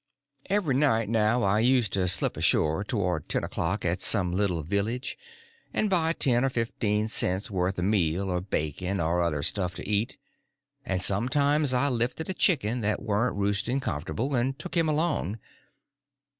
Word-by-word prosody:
Every 195 Hz, -8 st, +1 dB
night 115 Hz, -6 st, +2 dB
now 115 Hz, +2 st, +2 dB
I 100 Hz, +2 st, +2 dB
used 120 Hz, -3 st, +2 dB
to 95 Hz, -2 st, +1 dB
slip 90 Hz, -, +2 dB
ashore 80 Hz, +5 st, +2 dB
towards 90 Hz, -, -2 dB
ten -, -, -1 dB
o'clock 90 Hz, +5 st, -2 dB
at 90 Hz, +2 st, -1 dB
some 90 Hz, -2 st, +3 dB
little 90 Hz, -4 st, 0 dB
village, 105 Hz, -, -2 dB, 0.6 s
and 215 Hz, -2 st, +1 dB
buy 165 Hz, -3 st, +3 dB
ten 125 Hz, -6 st, +1 dB
or 135 Hz, -, +2 dB
fifteen 110 Hz, -3 st, -1 dB
cents' 95 Hz, -2 st, 0 dB
worth 95 Hz, 0 st, -1 dB
of 90 Hz, -, -1 dB
meal 95 Hz, -2 st, +1 dB
or 90 Hz, 0 st, -1 dB
bacon 90 Hz, +1 st, -3 dB
or 85 Hz, +2 st, +1 dB
other 75 Hz, -4 st, -1 dB
stuff 90 Hz, +2 st, -1 dB
to -, -, -7 dB
eat; 105 Hz, +5 st, -1 dB, 0.7 s
and 90 Hz, -1 st, -1 dB
sometimes 140 Hz, +8 st, +2 dB
I 130 Hz, +2 st, +2 dB
lifted 125 Hz, +7 st, -2 dB
a -, -, -2 dB
chicken 125 Hz, -, +1 dB
that 105 Hz, 0 st, 0 dB
warn't 110 Hz, +3 st, 0 dB
roosting 100 Hz, +6 st, 0 dB
comfortable, 115 Hz, -, -3 dB
and 130 Hz, +2 st, 0 dB
took 170 Hz, +4 st, -7 dB
him 165 Hz, -2 st, +2 dB
along. 150 Hz, -, -1 dB
105 Hz, 165 wpm, -27 LUFS, 90-130 Hz, 0.7 s, some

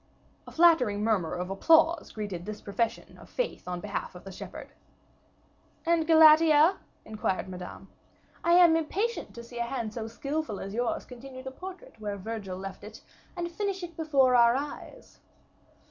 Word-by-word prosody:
A -, -, -9 dB
flattering 285 Hz, -12 st, +4 dB
murmur 200 Hz, -7 st, 0 dB
of 180 Hz, +1 st, -4 dB
applause 325 Hz, -, +3 dB
greeted 205 Hz, -5 st, -5 dB
this 215 Hz, 0 st, -5 dB
profession 220 Hz, +3 st, -3 dB
of -, -, -15 dB
faith -, -, -3 dB
on 180 Hz, -1 st, -3 dB
behalf 200 Hz, -1 st, -5 dB
of 180 Hz, -, -11 dB
the 195 Hz, -, -9 dB
shepherd. -, -, -9 dB, 1.1 s
"And 330 Hz, -1 st, +2 dB
Galatea?" 315 Hz, +1 st, +7 dB, 0.3 s
inquired 210 Hz, -4 st, -2 dB
Madame. 180 Hz, -1 st, -9 dB, 0.6 s
"I 340 Hz, -, +3 dB
am 345 Hz, -2 st, +7 dB
impatient 390 Hz, -, -2 dB
to 235 Hz, -, -8 dB
see 235 Hz, 0 st, -9 dB
a -, -, +1 dB
hand 235 Hz, -3 st, -4 dB
so 225 Hz, -1 st, -5 dB
skillful 275 Hz, -1 st, -4 dB
as 195 Hz, +1 st, -6 dB
yours 240 Hz, +1 st, -1 dB
continue 260 Hz, +1 st, -10 dB
the 265 Hz, -, -6 dB
portrait 365 Hz, -3 st, -10 dB
where 205 Hz, -1 st, -4 dB
Virgil 195 Hz, -2 st, -6 dB
left 195 Hz, 0 st, -8 dB
it, -, -, -11 dB, 0.4 s
and 345 Hz, 0 st, -3 dB
finish 395 Hz, 0 st, -3 dB
it 340 Hz, -2 st, -7 dB
before 275 Hz, -6 st, +3 dB
our 235 Hz, 0 st, +6 dB
eyes." 285 Hz, +2 st, -7 dB
250 Hz, 160 wpm, -28 LUFS, 210-325 Hz, 1.1 s, Galatea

